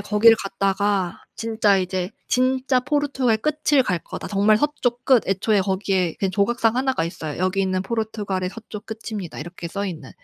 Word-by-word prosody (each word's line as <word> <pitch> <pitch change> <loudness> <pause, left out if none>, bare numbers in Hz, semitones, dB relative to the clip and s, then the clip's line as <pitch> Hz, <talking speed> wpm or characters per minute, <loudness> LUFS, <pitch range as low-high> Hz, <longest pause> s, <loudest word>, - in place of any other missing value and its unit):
거기를 215 +2 +5
갔다가 195 -1 0
진짜 220 -3 +2
이제 185 0 -2 0.2
'진짜 255 0 +2
포르투갈 275 -5 +1
끝을 300 +1 +2
갈 180 -8 0
거다. 165 - -8
정말 210 +1 +3
서쪽 250 -4 -1
끝.' 255 -4 +4
애초에 195 +2 +2
거기에 190 -1 0
이렇게 190 +4 -2
조각상 225 +4 +1
1 265 +1 +1
가 165 - -1
있어요. 160 -3 -5
'여기는 185 0 0
포르투갈의 205 -4 -2
서쪽 215 -1 -9
끝입니다.' 215 -5 -6
이렇게 170 +2 -7
써 200 +3 -3
있는. 155 -7 -7
205 Hz, 365 characters per minute, -23 LUFS, 185-235 Hz, 0.2 s, 거기를